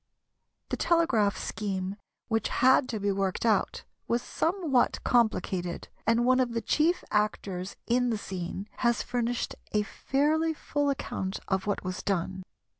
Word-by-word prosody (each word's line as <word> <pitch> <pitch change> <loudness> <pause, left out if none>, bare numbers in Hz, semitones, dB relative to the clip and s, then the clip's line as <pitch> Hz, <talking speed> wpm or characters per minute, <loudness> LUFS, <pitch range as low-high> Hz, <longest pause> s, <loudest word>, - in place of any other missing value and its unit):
The - - -1
telegraph 260 - +2
scheme 195 -2 -3 0.3
which 225 -2 0
had 260 +1 +4
to 220 - -2
be 200 0 +1
worked 195 +2 -1
out 215 -4 +1 0.2
was 235 +1 +1
somewhat 325 -8 +1
complicated, 195 -7 +1 0.2
and 230 +1 +3
one 255 +1 +4
of 245 -2 +1
the 230 - -1
chief 330 +4 +2
actors 195 -3 -1
in 245 +1 +2
the 225 - 0
scene 190 0 -5
has 235 -1 +2
furnished 245 -1 -1 0.2
a 210 0 +3
fairly 310 +8 +1
full 290 -1 -1
account 195 -8 -3
of 190 +1 0
what 205 - -1
was 185 +1 -4
done. 190 -1 -1
225 Hz, 145 wpm, -29 LUFS, 195-255 Hz, 0.3 s, had